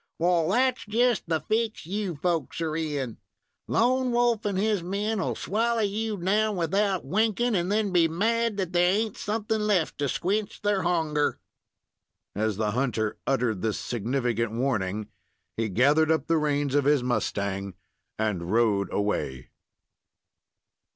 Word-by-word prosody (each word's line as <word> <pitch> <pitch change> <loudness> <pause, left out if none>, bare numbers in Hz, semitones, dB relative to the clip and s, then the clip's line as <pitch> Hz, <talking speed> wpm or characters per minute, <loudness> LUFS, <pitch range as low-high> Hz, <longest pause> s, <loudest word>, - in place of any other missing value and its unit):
Wal, 170 -1 +2
that's 255 +4 +2
just 235 -4 +1
the 160 -1 +2
fix 220 +4 -1
you 195 0 -3
folks 165 +2 -2
are 160 -2 -2
in. 145 -7 -3 0.5
Lone 255 +2 +2
Wolf 240 -2 +1
and 200 -2 0
his 210 -1 +1
men 205 +5 -2
will - - -1
swallow 230 +3 0
you 210 +1 -1
down 210 +4 +1
without 190 +2 0
winkin', 220 - +1
and 180 -1 0
then 210 -1 +1
be 170 -2 +4
mad 225 +6 0
that 185 -2 -2
there 175 0 +4
ain't 215 0 0
somethin' 215 0 -2
left 185 -9 +1
to 140 -1 0
squinch 200 - -2
thar 205 -2 +1
hunger." 160 -4 0 0.9
As 110 0 -1
the 105 -1 0
hunter 115 -3 -1
uttered 120 -7 0
this 110 -2 -1
significant 120 -1 -1
warning, 110 -5 -1 0.5
he 115 -1 -1
gathered 145 - +3
up 160 -3 +2
the 165 -1 +2
reins 145 -2 0
of 145 -1 +2
his 145 -3 +3
mustang 100 -5 -2 0.4
and 95 -5 -2
rode 110 -3 +2
away. 70 -11 -2
170 Hz, 145 wpm, -26 LUFS, -, 0.9 s, be